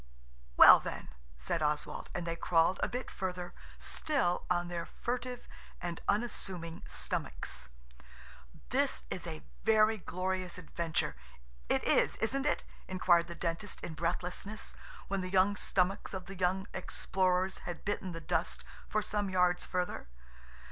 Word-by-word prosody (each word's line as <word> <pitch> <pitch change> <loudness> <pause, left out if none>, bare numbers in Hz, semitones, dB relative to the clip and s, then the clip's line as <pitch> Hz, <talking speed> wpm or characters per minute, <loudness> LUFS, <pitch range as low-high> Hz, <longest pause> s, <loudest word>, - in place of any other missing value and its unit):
"Well, - - +11
then," - - -6 0.3
said 110 - -1
Oswald, 150 0 -1
and 175 - -2
they 165 0 -1
crawled 170 +2 +3
a - - +2
bit 250 +1 -4
further 180 -2 -4 0.2
still 265 - 0
on 175 -1 +2
their 175 -1 -3
furtive 250 0 -4 0.3
and 170 -1 -4
unassuming 190 -6 -1
stomachs. 65 -1 -1 1.0
"This - - +2
is - - -4
a 75 -2 -6 0.2
very 220 0 +4
glorious 185 0 -2
adventure. 165 - -2 0.5
It - - +2
is, - - +4
isn't 275 +5 0
it?" - - +1 0.2
inquired 175 -2 +4
the 170 - -7
Dentist 170 +4 -3
in 165 - -4
breathlessness, 180 +5 -2 0.3
when 195 -1 -1
the 185 - -3
young 190 +2 +4
stomachs 190 0 0
of 185 -1 -5
the 195 - -8
young 185 +1 +1
explorers 185 0 0
had 175 - -6
bitten 200 -2 -1
the 165 - -5
dust 160 - -1 0.3
for 215 - +1
some 205 -1 -1
yards 180 -1 +2
further. 180 -1 -2
185 Hz, 140 wpm, -33 LUFS, 170-200 Hz, 1.0 s, Well